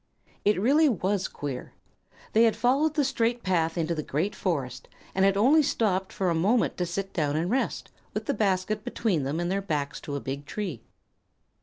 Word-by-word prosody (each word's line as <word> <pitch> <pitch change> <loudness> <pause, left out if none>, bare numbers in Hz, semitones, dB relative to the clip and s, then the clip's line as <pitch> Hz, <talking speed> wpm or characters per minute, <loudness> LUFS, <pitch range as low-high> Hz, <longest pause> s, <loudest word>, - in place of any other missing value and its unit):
It 205 -2 +3
really 290 +8 +4
was 195 -3 0
queer. 140 -3 -6 0.6
They 225 +2 +6
had 225 - +3
followed 280 +5 +2
the 295 - +3
straight 240 -3 0
path 165 -3 +1
into 165 0 0
the 155 - -2
great 155 +8 -1
forest, 135 - -3 0.3
and 190 - +2
had 195 0 +4
only 275 +9 +5
stopped 195 -8 0
for 185 -3 0
a - - +2
moment 200 +9 +2
to 180 - -1
sit 195 +3 -4
down 150 -3 0
and 170 +5 0
rest, 265 +2 -1 0.2
with - - -2
the - - 0
basket 205 +1 0
between 200 -10 0
them 140 +4 -2
and 175 +1 -1
their 195 +1 0
backs 150 -7 -3
to 145 - -5
a - - -1
big 140 +2 -5
tree. 180 - -4
190 Hz, 195 wpm, -27 LUFS, 160-220 Hz, 0.6 s, They